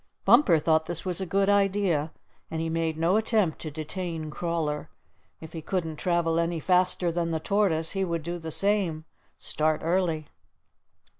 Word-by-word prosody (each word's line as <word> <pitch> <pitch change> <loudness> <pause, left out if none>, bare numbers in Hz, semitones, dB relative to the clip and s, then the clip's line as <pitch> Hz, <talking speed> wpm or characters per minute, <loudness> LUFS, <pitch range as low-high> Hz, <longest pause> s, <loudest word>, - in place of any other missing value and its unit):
Bumper 205 - +6
thought 160 +1 +1
this 175 +2 -3
was 185 0 0
a 190 - -3
good 195 +3 +1
idea, 195 -6 +2 0.4
and 160 - -4
he 165 0 -2
made 165 -1 -1
no 170 +5 +2
attempt 215 -7 +1
to 155 - -5
detain 160 +1 -5
Crawler. 165 -3 -2 0.5
If 160 - -11
he 165 - -5
couldn't 165 -2 -3
travel 170 -1 +1
any 170 0 -1
faster 180 0 +2
than 170 0 -1
the 160 -1 -1
Tortoise, 165 -3 +1
he 195 -1 0
would 170 -3 -2
do 175 +2 -4
the 160 -1 -6
same 185 -4 +1 0.3
start 155 0 0
early. 165 -2 0
170 Hz, 165 wpm, -27 LUFS, 160-185 Hz, 0.5 s, Bumper